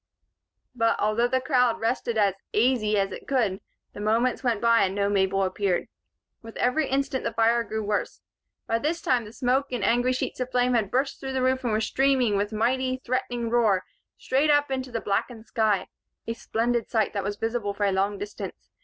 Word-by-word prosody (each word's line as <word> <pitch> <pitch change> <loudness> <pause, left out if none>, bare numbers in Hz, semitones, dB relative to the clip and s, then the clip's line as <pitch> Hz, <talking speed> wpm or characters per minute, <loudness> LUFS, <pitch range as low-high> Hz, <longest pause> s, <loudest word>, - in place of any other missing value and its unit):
But, 230 -2 +1
although 215 +3 +2
the 260 +1 +1
crowd 250 -3 +2
rested 235 0 -1
as 200 -3 +3 0.2
"aisy" 215 -2 +2
as 195 -1 +1
it - - -9
could, 225 -9 0 0.3
the - - -9
moments 230 +5 +1
went 235 -4 +1
by 230 0 +4
and 190 0 +1
no 200 0 +1
Mabel 195 -1 +2
appeared. 185 -1 -1 0.5
With 225 -1 -10
every 270 +4 +1
instant 270 0 -1
the 230 - -2
fire 230 +1 +3
grew 220 -1 -4
worse. 205 0 -2 0.5
By 230 - 0
this 315 +6 -1
time, 250 -7 +1
the 210 - -10
smoke 255 +4 0
and 245 -5 -2
angry 245 +3 +2
sheets 255 - -3
of 255 0 -2
flame 250 0 +2
had 220 -5 +1
burst 270 +2 -1
through 265 0 -5
the 260 -1 0
roof 260 0 +1
and 240 - 0
were 215 +1 +1
streaming, 260 -3 +2
with 205 +1 -1
a - - -5
mighty, 255 +3 0
threatening 240 -2 -2
roar, 220 -6 +3 0.3
straight 275 +4 +1
up 290 -1 +3
into 260 -1 -3
the 230 -1 -3
blackened 220 +3 -2
sky 210 -5 +1 0.4
a 230 - -2
splendid 230 0 -1
sight 220 -2 +1
that 200 - -2
was 205 +1 -2
visible 225 -3 -2
for 205 - 0
a 200 - +2
long 195 +2 0
distance. 205 +1 -8
230 Hz, 205 wpm, -26 LUFS, 210-255 Hz, 0.5 s, by